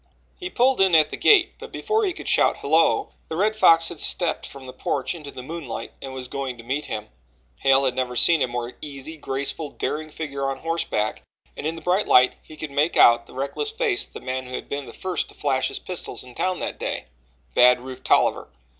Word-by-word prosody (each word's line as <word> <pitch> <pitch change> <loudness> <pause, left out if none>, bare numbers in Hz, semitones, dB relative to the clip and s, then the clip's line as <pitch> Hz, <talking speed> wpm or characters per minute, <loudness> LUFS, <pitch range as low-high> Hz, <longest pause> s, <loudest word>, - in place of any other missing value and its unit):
He 360 -1 -5
pulled 255 - +2
in 190 -3 +5
at 155 -1 +5
the - - -3
gate, 380 -4 +5
but - - -10
before 435 0 0
he 370 - -1
could - - -9
shout - - +3
"Hello" 160 +3 +2 0.2
the 160 - -5
Red 215 +3 +2
Fox 165 -6 +5
had 170 - -8
stepped 170 -3 +1
from 135 -1 -11
the 130 - -9
porch 135 +2 -2
into 155 -4 -9
the 130 -2 -8
moonlight 140 -6 -6
and 135 - -7
was 130 -1 -5
going 135 -2 -4
to 115 - -11
meet 140 +5 -2
him. 105 0 -5 0.5
Hale 135 - +4
had 130 - +1
never 125 -1 -2
seen 165 +4 +5
a - - +3
more 120 0 -4
easy, 145 +1 -8
graceful, 140 +1 -3
daring 155 +2 -4
figure 140 -3 -4
on 135 - -3
horseback, 165 -10 -1 0.3
and 145 - -4
in 165 - -2
the 165 - -10
bright 185 +4 +1
light 125 0 +5
he 155 - -14
could 150 -1 -6
make 150 +4 +1
out 120 0 +6
the - - -15
reckless 140 - -2
face 450 -4 0
of - - -22
the - - -8
man 130 0 -4
who 125 - -5
had - - -6
been 140 -1 -5
the - - -9
first 185 -3 -3
to - - -11
flash 130 -3 0
his - - -5
pistol 180 -2 -6
in 125 -1 -13
town 185 +6 -1
that - - -5
day - - -3 0.5
Bad 125 0 +6
Rufe 130 +1 -9
Tolliver. - - +2
145 Hz, 230 wpm, -23 LUFS, 130-170 Hz, 0.5 s, out